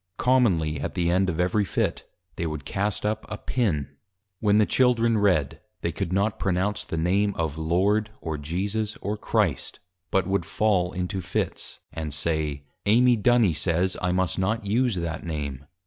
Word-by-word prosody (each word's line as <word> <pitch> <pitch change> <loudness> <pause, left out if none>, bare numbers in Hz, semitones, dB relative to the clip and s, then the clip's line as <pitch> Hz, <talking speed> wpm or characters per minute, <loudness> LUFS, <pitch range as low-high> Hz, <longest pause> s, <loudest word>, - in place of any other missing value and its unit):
Commonly 95 - +2
at 70 - -4
the 85 -2 +1
end 95 +1 +2
of 85 -1 -3
every 90 +4 +2
Fit, 95 - -2 0.3
they 85 - -2
would 75 -3 -5
cast 100 +1 -2
up 110 +1 -1
a 105 - -4
Pin. 75 - -1 0.4
When 105 -1 +3
the 105 - +5
Children 115 -3 +3
Read, 90 -10 +2 0.2
they - - -1
could 85 - -3
not 100 +3 0
pronounce 95 +2 0
the 80 - -5
Name 100 +5 +1
of, 80 -3 -2
Lord, 100 +7 +2
or 80 -2 -4
Jesus, 100 +8 -2
or 105 +1 -2
Christ, 105 - -1 0.3
but 95 - +2
would 95 -1 0
fall 90 -1 +1
into 95 0 -3
Fits; 85 - -3 0.2
and 75 -3 -4
say, 75 -2 -1 0.2
Amy 120 +3 +5
Duny 110 -5 +3
says, 85 +4 0
_I 90 - +1
must 95 0 0
not 105 +4 0
use 115 +2 +1
that 85 -2 -3
Name. 75 -4 -4
95 Hz, 170 wpm, -25 LUFS, 80-105 Hz, 0.4 s, the